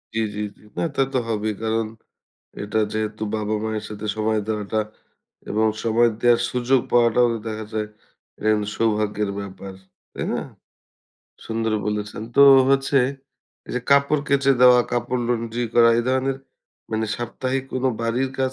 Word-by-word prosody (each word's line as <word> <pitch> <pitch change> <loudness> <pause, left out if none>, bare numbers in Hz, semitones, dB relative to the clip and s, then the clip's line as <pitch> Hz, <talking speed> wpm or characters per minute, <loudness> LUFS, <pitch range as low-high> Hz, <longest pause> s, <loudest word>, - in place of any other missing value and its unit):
জি, - - +1 0.2
জি, 105 - -3 0.2
জি। - - -23 0.2
না, - - 0
তা - - +2
তো - - +2
হবেই, 110 -1 -1
কারণ 110 0 0 0.8
এটা 105 +2 -1
যেহেতু 110 0 -3
বাবা-মায়ের 110 0 -2
সাথে 105 0 -7
সময় 110 0 +1
দেওয়াটা 110 0 -1 0.7
এবং 110 +1 +2 0.2
সময় 115 +1 +3
দেয়ার 120 -1 +4
সুযোগ 125 +1 +2
পাওয়াটাও 120 0 +4
তো 115 - -4
দেখা 110 -1 -4
যায় 105 -1 -2 0.5
এটা 110 - -2
কিন্তু 105 -1 -1
সৌভাগ্যের 105 -2 0
ব্যাপার, 95 0 -9 0.4
তাই - - -4
না? - - -1 1.1
সুন্দর 115 0 -1
বলেছেন। 105 0 -3
তো - - +6 0.3
হচ্ছে 135 +1 +2 0.7
এই - - -7
যে 125 - -1
কাপড় 140 +1 +4
কেচে 140 0 +3
দেওয়া, 125 -1 +8
কাপড় 120 +1 -1
laundry 115 0 -1
করা, 115 -1 +6
এই - - +1
ধরনের, 130 +1 0 0.5
মানে 110 0 -1
সাপ্তাহিক 130 +3 -3
কোনো 130 0 0
বাড়ির 125 +3 0
কাজ 130 0 0
115 Hz, 150 wpm, -22 LUFS, 110-125 Hz, 1.1 s, দেওয়া